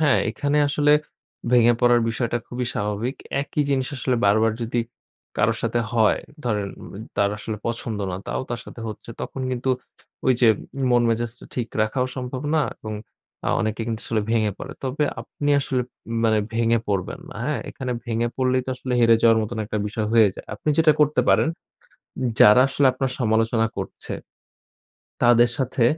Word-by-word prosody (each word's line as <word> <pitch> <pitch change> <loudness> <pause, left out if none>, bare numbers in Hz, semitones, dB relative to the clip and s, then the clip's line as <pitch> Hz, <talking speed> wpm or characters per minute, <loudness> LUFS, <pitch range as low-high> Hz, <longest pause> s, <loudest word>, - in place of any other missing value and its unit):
হ্যা, 155 - +3 0.2
এখানে 145 +1 -1
আসলে 145 0 +3 0.6
ভেঙে 120 -1 +6
পড়ার 120 -1 +5
বিষয়টা 120 +1 -1
খুবই 125 0 -3
স্বাভাবিক। 105 +5 -2 0.3
একই 150 +1 -1
জিনিস 130 -2 +1
আসলে 130 0 0
বারবার 110 +2 +4
যদি 115 +1 -2 0.6
কারো 110 +2 +3
সাথে 115 +1 0
হয় 110 -3 +3 0.3
ধরেন 105 -4 0
উ - - -9 0.3
তার 100 0 +3
আসলে 110 0 -5
পছন্দ 115 -2 -3
না, 90 - -3
তাও - - -2
তার 120 - -3
সাথে - - -10
হচ্ছে। 110 +2 -8
তখন 135 - -5
কিন্তু 130 +1 -1 0.5
ঐ - - -1
যে 120 - +6 0.4
মন 120 -1 +4
মেজাজটা 115 +1 -3
ঠিক 120 -2 -2
রাখাও 125 +4 0
সম্ভব 130 0 -4
না 155 - +3 0.2
এবং 110 -1 -6 0.5
আ - - +2
অনেকে 110 +1 -2
কিন্তু 115 -1 -3
আসলে 110 -2 0
ভেঙে 110 -2 +2
পড়ে। - - -7
তবে 135 +3 0 0.2
আপনি 145 0 -3
আসলে 130 -2 -1 0.4
মানে 110 -1 +4 0.2
ভেঙে 115 0 +3
পড়বেন 100 -3 -2
না। - - -10
হ্যা, - - 0
এখানে 130 -1 -4
ভেঙে 120 0 0
পড়লেই 130 0 +2
তো - - -2
আসলে 130 0 -4
হেরে 115 -1 +6
যাওয়ার 115 -1 +6
মতো 110 +2 -5
একটা 105 - -2
বিষয় 105 +1 -2
হয়ে 115 -3 +6
যায়। - - -10
আপনি - - -5
যেটা 160 -1 +6
করতে 150 0 +4
পারেন, - - +4 0.9
যারা 105 +4 +8
আসলে 140 +1 +1
আপনার 130 0 -2
সমালোচনা 115 -1 +2
করছে, - - -6 1.1
তাদের 120 0 +6
সাথে 130 -2 +1
120 Hz, 170 wpm, -23 LUFS, 110-130 Hz, 1.1 s, যারা